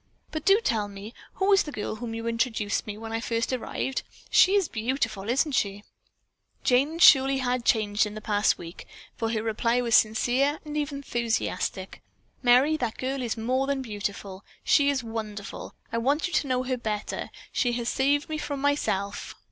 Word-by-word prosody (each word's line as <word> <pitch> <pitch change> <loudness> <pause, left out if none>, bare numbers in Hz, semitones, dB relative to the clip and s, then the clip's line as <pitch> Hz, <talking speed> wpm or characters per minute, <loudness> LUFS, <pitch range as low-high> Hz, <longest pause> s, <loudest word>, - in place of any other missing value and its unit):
But 310 -1 -5
do 395 +2 +6
tell 220 - 0
me 200 +3 -9 0.2
who 395 +1 +2
is 390 - +6
the 300 - -5
girl 210 -5 -4
to 215 - -9
whom 230 -1 -5
you 230 0 -5
introduced 230 -3 -1
me 210 0 -5
when 225 0 -7
I 225 - 0
first 230 +2 -1
arrived? 260 +1 -2 0.3
She 380 +2 +6
is 390 -5 +3
beautiful, 225 -3 -2
isn't 275 +5 +2
she?" 205 -5 -1 0.8
Jane 275 +5 +2
surely 270 -5 +7
had 250 -2 -1
changed 210 -1 +2
in 210 - -8
the - - -5
past 210 0 +1
week, 170 0 -10 0.3
for 225 - -2
her 220 -1 -1
reply 230 +2 +1
was 235 -2 -1
sincere 245 +7 +3
and 300 0 -6
even 295 -1 -2
enthusiastic. 225 -5 -2 0.4
"Merry, 255 +5 +4
that 240 -6 -3
girl 265 +1 -2
is 235 -2 -2
more 255 +4 0
than 275 -1 -1
beautiful. 200 -3 -5 0.2
She 285 -1 +4
is 270 -3 0
wonderful! 215 -3 -6 0.2
I 230 - +1
want 285 +9 +1
you 360 - -4
to 285 - +1
know 255 -1 0
her 255 0 -2
better. 215 -3 -4 0.2
She 245 -2 +1
has 235 -1 -2
saved 280 +3 +1
me 310 -1 -3
from 285 -2 -4
myself." 205 -9 -1
240 Hz, 190 wpm, -26 LUFS, 215-275 Hz, 0.8 s, surely